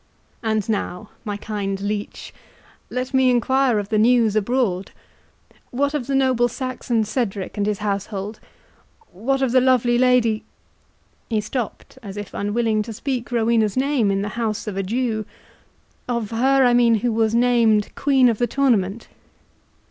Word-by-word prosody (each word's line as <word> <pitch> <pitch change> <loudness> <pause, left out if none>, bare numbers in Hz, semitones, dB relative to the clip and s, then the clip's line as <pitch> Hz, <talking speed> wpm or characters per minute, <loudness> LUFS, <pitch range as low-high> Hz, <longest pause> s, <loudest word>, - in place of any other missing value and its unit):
And 220 -3 -1
now, 205 -2 -3
my 205 -3 -4
kind 200 -2 -4
leech, 205 +1 -5 0.6
let 255 +2 -4
me 260 -1 +4
enquire 250 0 +2
of 205 -1 -3
the 215 - +1
news 230 -1 +4
abroad. 215 -4 0 0.8
What 280 +3 -1
of 275 -5 -3
the 275 - 0
noble 260 -3 +3
Saxon 245 -2 -2
Cedric 210 -3 -3
and 205 0 -1
his 210 -1 0
household?—what 210 - -5
of 260 - +1
the 255 0 +4
lovely 245 -2 +3
Lady—" 245 -4 +3 0.9
He 220 -2 +1
stopt, 225 +2 -5
as 200 -2 -8
if 205 - -7
unwilling 215 +1 0
to 220 +2 -6
speak 245 +1 -4
Rowena's 225 -2 +1
name 265 -5 +2
in 195 0 0
the 205 - -3
house 220 -2 -3
of 210 -3 -5
a 195 - -1
Jew—"Of 225 +1 -5
her, 265 +3 +3
I 245 - +4
mean, 240 -1 +4
who 240 - +1
was 220 0 +1
named 235 -3 +3
Queen 270 -3 +3
of 230 -3 +1
the 240 - +2
tournament?" 235 -7 0
230 Hz, 150 wpm, -21 LUFS, 210-250 Hz, 0.9 s, me